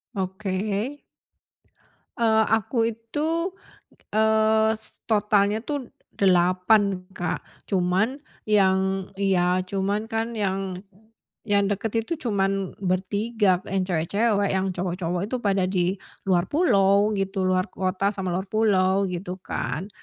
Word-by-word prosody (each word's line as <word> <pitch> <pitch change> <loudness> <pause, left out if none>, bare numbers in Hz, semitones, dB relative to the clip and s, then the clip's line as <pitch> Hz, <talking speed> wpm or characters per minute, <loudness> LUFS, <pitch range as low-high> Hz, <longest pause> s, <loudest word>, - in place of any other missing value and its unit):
Oke. 195 +2 -2 1.3
Eee, 220 -1 +4
aku 225 +1 +1
itu, 315 - -2 0.6
eee, 220 0 +3
s 220 0 -12
totalnya 210 0 +2
tuh 285 -4 -4 0.2
8 185 +1 +2
Kak. 175 - -2 0.3
Cuman 190 +9 +1 0.2
yang 190 -2 +2
ya, 185 -2 +2
cuman 200 +3 -2
kan 225 +1 -2
yang 190 -2 -2 0.6
yang 205 -2 +2
deket 220 +3 -1
itu 335 - -2 0.2
cuman 195 -1 -1
bertiga, 195 +1 0
yang 195 0 -1
cewek-cewek, 200 +4 +1
yang 190 0 0
cowok-cowok 180 0 -2
itu 240 +5 -3
pada 195 -2 +1
di 185 0 0 0.3
luar 180 -1 +3
pulau 200 - +3
gitu, 195 0 -1
luar 185 0 +2
kota 190 +2 -1
sama 190 -2 -3
luar 185 +3 -2
pulau, 195 -2 +2
gitu 180 +1 -5
kan. 185 +7 -4
195 Hz, 115 wpm, -24 LUFS, 185-220 Hz, 1.3 s, Eee